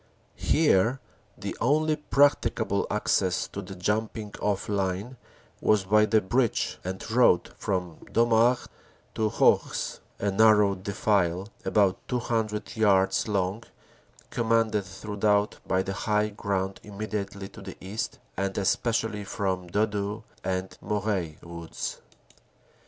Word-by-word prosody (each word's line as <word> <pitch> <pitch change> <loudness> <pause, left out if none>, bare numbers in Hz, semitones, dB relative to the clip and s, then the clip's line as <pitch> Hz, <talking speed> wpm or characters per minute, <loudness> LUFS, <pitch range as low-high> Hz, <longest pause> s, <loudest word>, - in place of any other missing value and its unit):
Here 130 -5 +3 0.4
the - - -5
only 155 +5 +3
practicable 145 -1 +2
access - - +1
to 100 - -5
the 95 0 -9
jumping 105 +2 -2
off 100 -2 0
line 100 +4 -2 0.5
was 105 -2 +3
by 105 +3 +4
the 110 0 +4
bridge 115 +4 0
and 95 +1 -5
road 120 -6 +4
from 90 -4 -2
Domart 115 +1 +3 0.5
to 110 -1 +1
Hourges, - - +2 0.2
a 100 - 0
narrow 105 -1 +5
defile 95 -1 0 0.2
about 100 -3 +3
200 110 -3 -2
yards 95 -3 +3
long 100 +1 0 0.7
commanded 115 -3 +1
throughout 105 +2 0
by 95 0 +2
the 95 - -3
high 105 +2 +1
ground 95 -2 -2
immediately 100 -1 -5
to - - -12
the - - -9
east 100 +4 -4 0.2
and 95 0 -2
especially 110 +1 0
from 95 -3 -2
Dodo 105 +2 -1 0.2
and 95 0 -2
Moreuil 100 -6 -1
woods. 85 -1 -6
105 Hz, 115 wpm, -27 LUFS, 95-110 Hz, 0.7 s, narrow